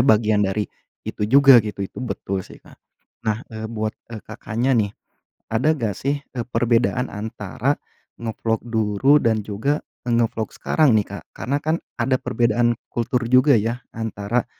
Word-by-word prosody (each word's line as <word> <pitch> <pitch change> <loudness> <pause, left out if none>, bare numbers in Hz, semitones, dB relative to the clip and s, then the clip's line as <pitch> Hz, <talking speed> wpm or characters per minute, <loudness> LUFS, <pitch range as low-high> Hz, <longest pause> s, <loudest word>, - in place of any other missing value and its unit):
bagian 110 -1 +4
dari 100 +1 +1 0.4
itu - - -5
juga 135 -1 +8
gitu, 105 -2 -4
itu - - -9
betul 100 -6 -3
sih - - -12
Kak. - - -16 0.5
Nah, 110 +2 -1
eee, 110 0 -5
buat, 110 -1 -2 0.2
e 110 -2 -8
Kakaknya 120 +5 -2
nih, 110 -4 +2 0.6
ada 150 +8 +2
gak 115 -8 -2
sih, 140 +1 -1
e 130 - -10
perbedaan 120 +1 +1
antara 110 +5 -2 0.5
nge-vlog 110 0 -1
dulu 115 +4 +3
dan 115 -6 +1
juga 110 +9 -1 0.2
nge-vlog 115 -2 0
sekarang 155 -6 +3
nih 105 -2 +3
Kak, 100 - -7
karena 140 +4 -1
kan 155 +2 0 0.2
ada 130 -1 +1
perbedaan 120 -1 +2 0.2
kultur 120 +1 0
juga 130 +2 +5
ya, 115 +4 -1
antara 110 +1 -2
115 Hz, 150 wpm, -22 LUFS, 110-125 Hz, 0.6 s, juga